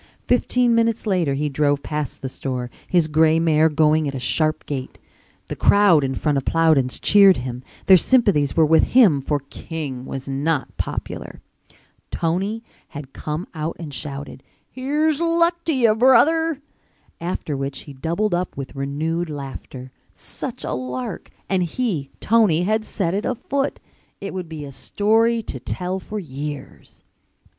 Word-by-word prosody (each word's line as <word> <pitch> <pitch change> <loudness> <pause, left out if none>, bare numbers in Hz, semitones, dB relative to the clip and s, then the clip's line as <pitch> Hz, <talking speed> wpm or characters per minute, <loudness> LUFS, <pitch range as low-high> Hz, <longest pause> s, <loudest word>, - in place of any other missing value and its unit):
Fifteen 245 -1 +2
minutes 230 0 +1
later 175 -9 +1
he 150 +2 -1
drove 145 0 +1
past 150 -4 -4
the - - -2
store, 125 -2 -4 0.2
his 175 -3 +2
gray 160 +1 +3
mare 160 -1 +3
going 155 0 +2
at 140 - -4
a - - -3
sharp 155 +4 0
gait. 135 -3 -5 0.5
The - - -6
crowd 200 -7 +5
in 135 0 -1
front 145 -1 +1
of 135 - -10
Plowden's 155 -6 +2
cheered 200 -2 +6
him, 125 0 -5 0.2
their 190 - +8
sympathies 185 - +2
were 160 - +6
with 160 +1 +5 0.2
him 180 - +6
for 145 +1 -1
King 140 -6 -6
was 135 0 -6
not 140 +2 -1
popular. - - -5 0.7
Tony 195 +7 -2 0.2
had 145 -2 -10
come 155 +4 -4
out 155 0 -3
and 155 -4 -7
shouted, 140 -1 -6 0.3
"Here's 295 +4 0
luck 335 +1 +2
to 330 - +1
you, 235 -4 +4
brother," 280 +7 +4 0.6
after 170 -3 -3
which 135 0 -4
he 145 - -11
doubled 170 +9 -1
up 175 -3 -2
with 135 0 -6
renewed 155 +5 -2
laughter. 135 -3 -8 0.2
Such - - -7
a - - -3
lark! 125 0 -5 0.2
And 190 -1 +1
he, 175 - -2
Tony, 210 -7 +3
had 215 +3 0
set 185 -6 -2
it 205 +2 -1
afoot! 275 +3 -2 0.4
It 200 - -6
would 180 -3 -5
be 155 -2 -6
a 140 - -9
story 225 - +1
to - - -6
tell 185 +1 -3
for 215 +3 -7
years. 145 -3 -8
160 Hz, 155 wpm, -22 LUFS, 140-210 Hz, 0.7 s, their